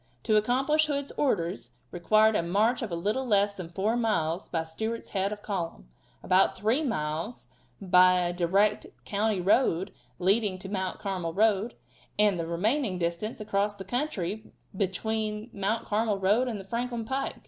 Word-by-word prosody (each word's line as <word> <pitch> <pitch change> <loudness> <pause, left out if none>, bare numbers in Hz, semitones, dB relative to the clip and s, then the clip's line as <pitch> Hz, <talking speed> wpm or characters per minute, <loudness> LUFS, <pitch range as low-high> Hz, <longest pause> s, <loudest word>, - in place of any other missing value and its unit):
To 215 - +2
accomplish 270 +8 +2
Hood's 280 -1 -2
orders 170 - -1 0.2
required 215 +5 +3
a - - +2
march 210 +9 +1
of 230 - -3
a 170 - -3
little 210 +10 -1
less 205 -4 +2
than 185 -4 -8
four 200 +6 0
miles 185 -7 0
by 165 -2 -1
Stewart's 220 +8 -4
head 195 +1 -1
of 210 -1 -7
column 170 - -4 0.3
about 185 +1 +3
three 225 +8 +1
miles 165 - -3 0.3
by 185 -1 +5
a 175 0 -1
direct 195 +4 +1 0.2
country 210 -1 0
road 190 -1 +2 0.2
leading 200 +2 +2
into 185 +1 -8
the - - -8
Mount 190 -2 -2
Carmel 185 -5 -3
road, 215 +1 +2 0.4
and 205 -4 +3
the 165 - -3
remaining 205 - 0
distance 170 +6 -2
across 205 -1 -1
the 190 -1 -9
country 245 - -2 0.2
lying - - -20 0.2
between 215 +3 -2
the - - -15
Mount 210 +4 0
Carmel 215 -1 0
road 205 +6 +2
and 225 -4 -3
the 195 - -9
Franklin 235 +2 -3
pike. 270 +3 -2
205 Hz, 170 wpm, -28 LUFS, 180-225 Hz, 0.4 s, by